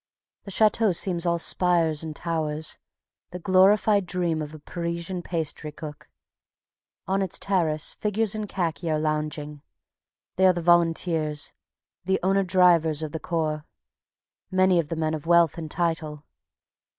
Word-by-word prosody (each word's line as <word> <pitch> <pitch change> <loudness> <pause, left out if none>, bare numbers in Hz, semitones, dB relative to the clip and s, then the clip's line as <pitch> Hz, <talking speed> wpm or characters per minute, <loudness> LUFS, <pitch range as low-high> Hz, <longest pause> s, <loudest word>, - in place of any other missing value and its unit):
The - - -8
Chateau 215 0 +3
seems 175 0 +1
all 170 0 +2
spires 170 -3 +2
and 155 -1 -6
towers, 155 -2 -3 0.5
the 180 - -7
glorified 190 +2 +3
dream 175 -3 -1
of 150 -1 -6
a - - -8
Parisian 170 +3 -4
pastrycook. 155 -2 -6 1.0
On 195 +1 0
its 190 -3 -1
terrace 165 -6 0
figures 210 0 -1
in 215 -1 -4
khaki 170 -4 -2
are 155 - +1
lounging. 150 -1 -3 0.8
They 190 0 +5
are 185 - +5
the 175 - -3
volunteers, 165 -3 +1 0.5
the 190 +1 +1
owner 195 +1 +3
drivers 170 -4 +3
of 155 - -4
the 160 - -4
Corps, 155 -3 -2 0.9
many 185 -1 +3
of 155 -3 -2
them 165 -1 -3
men 155 0 0
of 155 0 -5
wealth 170 -2 +4
and 160 -1 -6
title. 160 -3 -2
170 Hz, 140 wpm, -25 LUFS, 155-185 Hz, 1.0 s, They